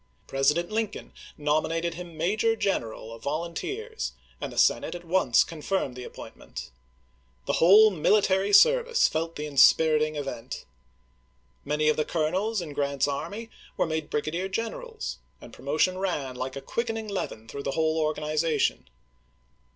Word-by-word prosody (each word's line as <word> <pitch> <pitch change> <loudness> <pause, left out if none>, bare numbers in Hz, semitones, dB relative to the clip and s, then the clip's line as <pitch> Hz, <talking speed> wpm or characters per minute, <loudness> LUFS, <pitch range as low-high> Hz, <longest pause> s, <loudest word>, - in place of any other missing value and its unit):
President 150 +7 +1
Lincoln 220 -1 -3 0.2
nominated 160 +3 0
him 170 -2 -9
major 215 +7 +1
general 115 - -2
of 115 - -11
volunteers, 170 - -4 0.3
and - - -4
the - - -11
Senate - - +3
at 175 0 -9
once 165 -8 +4
confirmed 160 -4 -3
the 125 - -7
appointment. - - -9 0.7
The - - 0
whole 210 +6 +8
military 195 +2 +2
service 480 - +5
felt 165 +1 -3
the 150 - -4
inspiriting 155 +2 +4
event. 135 -5 -5 1.0
Many 150 +1 0
of 155 - +3
the 155 - +2
colonels 185 +7 0
in 155 -4 -7
Grant's 140 -1 0
army 170 +11 -4 0.3
were - - +2
made 160 -2 -3
brigadier 170 +6 -2
gen 225 +4 -2
erals; 480 -3 -6 0.2
and - - -13
promotion 155 +6 0
ran, 150 -9 -2
like 130 +1 -4
a 135 - -5
quickening 225 - -3
leaven, 150 - -4
through 140 - -6
the 140 - -3
whole 160 0 +2
organization. 155 +1 0
160 Hz, 145 wpm, -27 LUFS, 150-195 Hz, 1.0 s, whole